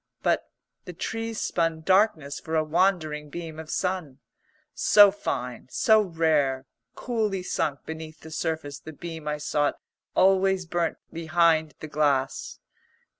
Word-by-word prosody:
But - - +1 0.4
the 180 - -7
trees 225 +5 -4
spun 165 -2 0
darkness 160 -6 +2
for 160 - -4
a 155 - +3
wandering 155 -3 +1
beam 160 0 -7
of 160 -1 -8
sun. 180 -8 -2 0.6
So 205 -1 +7
fine, 125 - -4
so 220 +10 +4
rare, 155 -7 +1 0.3
coolly 215 -6 -1
sunk 155 -5 -2
beneath 160 -1 -8
the 160 - -11
surface 155 -3 -3
the 160 - -10
beam 160 0 -8
I 150 0 -1
sought 150 -1 0 0.4
always 190 -1 +3
burnt 170 0 -1 0.2
behind 165 -1 +2
the 155 - -5
glass. 145 -3 0
160 Hz, 130 wpm, -26 LUFS, 150-185 Hz, 0.6 s, So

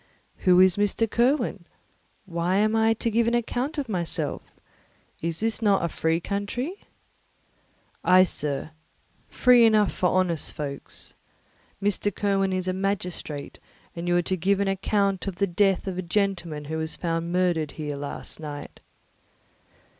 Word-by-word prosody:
"Who 180 -1 +4
is 185 0 +5
Mr. 205 +2 +1
Kirwin? 250 +7 +1 0.6
Why 175 0 -1
am 215 +2 +2
I 225 0 +3
to 230 +1 -1
give 230 +1 +2
an 235 - +2
account 245 +5 -2
of 285 -3 -2
myself? 180 -6 -2 0.8
Is 190 +8 -1
not 205 -3 +3
this 170 - -2
a - - -15
free 160 +1 +1
country?" 210 - -4 1.2
"Ay, 185 0 +7
sir, 150 -4 -2 0.6
free 250 -2 +5
enough 215 -3 +4
for 180 - +1
honest 180 -4 0
folks. 140 -2 -5 0.7
Mr. 205 0 +1
Kirwin 195 -1 0
is 185 0 -2
a 185 - +1
magistrate, 180 -6 -3 0.4
and 170 +1 -5
you 175 0 +3
are 175 - +2
to 185 - 0
give 190 +3 +1
an 200 - +1
account 195 0 0
of 195 - -3
the 200 - +1
death 195 +1 +1
of 185 -2 -3
a - - 0
gentleman 175 -5 -1
who 160 +2 -3
was 160 0 -3
found 165 0 -2
murdered 175 -4 +1
here 150 -2 -4
last 140 +2 -5
night." 145 -2 -8
185 Hz, 155 wpm, -25 LUFS, 170-205 Hz, 1.2 s, Ay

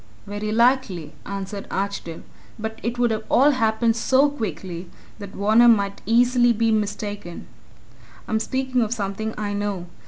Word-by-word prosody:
"Very 205 +1 -4
likely," 235 - +1
answered 200 0 -5
Archdale. 195 -4 -4 0.3
"But 220 0 -5
it 235 +1 -3
would 240 -1 +2 0.2
all 280 +4 +5
happen 225 -2 +2
so 265 +5 +3
quickly 185 - -5 0.3
that 200 -1 -7
Varner 215 +4 +5
might 200 -4 +3
easily 240 +1 +4
be 225 0 +1
mistaken. 205 -4 -3 0.8
I'm 220 - 0
speaking 260 +2 -1
of 225 +1 0
something 210 +1 -3
I 205 -1 -3
know. 205 -3 -3
220 Hz, 135 wpm, -23 LUFS, 200-235 Hz, 0.8 s, all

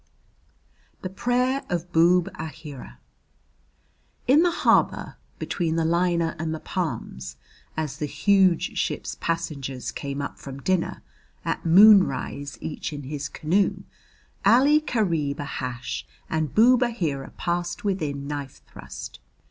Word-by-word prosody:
THE 185 - -4
PRAYER 250 +6 +1
OF 175 0 -3
BOOB 170 +2 +4
AHEERA 150 - -8 1.3
In 275 +6 +6
the 350 - +4
harbour, 340 - +2 0.2
between 165 -3 -1
the 165 -1 +1
liner 170 0 +1
and 160 0 -2
the - - -6
palms, 65 - -4 0.4
as 150 -3 -2
the 150 - -2
huge 185 +4 +2
ship's - - -2
passengers 140 -6 -3
came 140 0 -5
up 140 - -5
from 135 0 -8
dinner, 180 +4 -1 0.4
at - - -2
moonrise, 170 -7 +5
each 160 - -4
in 145 -1 -6
his 140 +1 -5
canoe, 185 +6 0 0.6
Ali 270 +9 +5
Kareeb 165 - 0
Ahash 130 -3 -4 0.3
and 155 -3 -1
Boob 245 +3 +6
Aheera 165 - -1
passed 175 +5 -2
within 155 -9 -2
knife 140 -2 -6
thrust. - - -9
165 Hz, 120 wpm, -25 LUFS, 145-190 Hz, 1.3 s, In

